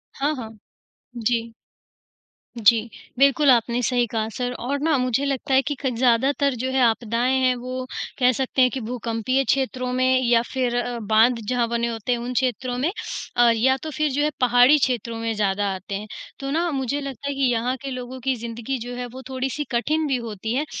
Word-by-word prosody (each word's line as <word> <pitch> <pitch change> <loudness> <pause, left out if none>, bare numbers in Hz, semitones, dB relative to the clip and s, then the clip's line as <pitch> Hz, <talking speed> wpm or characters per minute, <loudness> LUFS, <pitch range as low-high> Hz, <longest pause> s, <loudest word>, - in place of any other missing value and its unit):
हाँ, 285 +3 0
हाँ, 225 -3 -9 0.6
जी। 230 0 -1 1.1
जी, 225 +2 +4 0.3
बिल्कुल, 280 +1 +5
आपने 240 0 +2
सही 245 0 +2
कहा 220 0 -2
सर 245 +1 -3
और 275 +4 -2
ना 310 -1 +2
मुझे 255 +2 0
लगता 275 0 -2
है 265 - +6
कि 290 - -1
क 265 - +1
ज़्यादातर 260 +3 +2
जो 255 +3 -2
है 265 0 +2
आपदाएँ 235 +3 +1
हैं, 255 0 +4
वो 255 +1 -5 0.3
कह 250 -1 +5
सकते 260 +1 0
हैं 255 - +6
कि 265 - -3
भूकंपीय 235 +2 -1
क्षेत्रों 255 -2 -1
में 255 0 +3
या 235 -1 +4
फिर 250 -2 0
अ, 245 -1 -2
बाँध 220 +3 +3
जहाँ 245 -2 +1
बने 235 0 0
होते 230 +1 -3
हैं, 240 - +1
उन 245 +1 -4
क्षेत्रों 250 0 -1
में 295 +8 0 0.5
अ, 240 -1 +6
या 265 +4 +3
तो 315 - -4
फिर 300 +1 0
जो 285 - 0
है 300 - +2
पहाड़ी 245 +4 +6
क्षेत्रों 235 -4 -1
में 225 0 -1
ज़्यादा 205 -1 0
आते 190 +2 -6
हैं। 210 +2 -5 0.3
तो 275 0 -4
ना 335 +3 +1
मुझे 275 0 -1
लगता 275 -1 -6
है 280 - -1
कि 275 - -3
यहाँ 240 +2 0
के 275 -1 -5
लोगों 255 +1 -6
की 265 -1 +1
ज़िंदगी 235 +3 -4
जो 245 +1 -6
है, 245 0 -4
वो 255 +2 -10
थोड़ी-सी 265 +2 -2
कठिन 305 +6 0
भी 270 - +1
होती 220 -1 -4
है, 295 - 0
250 Hz, 205 wpm, -23 LUFS, 235-265 Hz, 1.1 s, है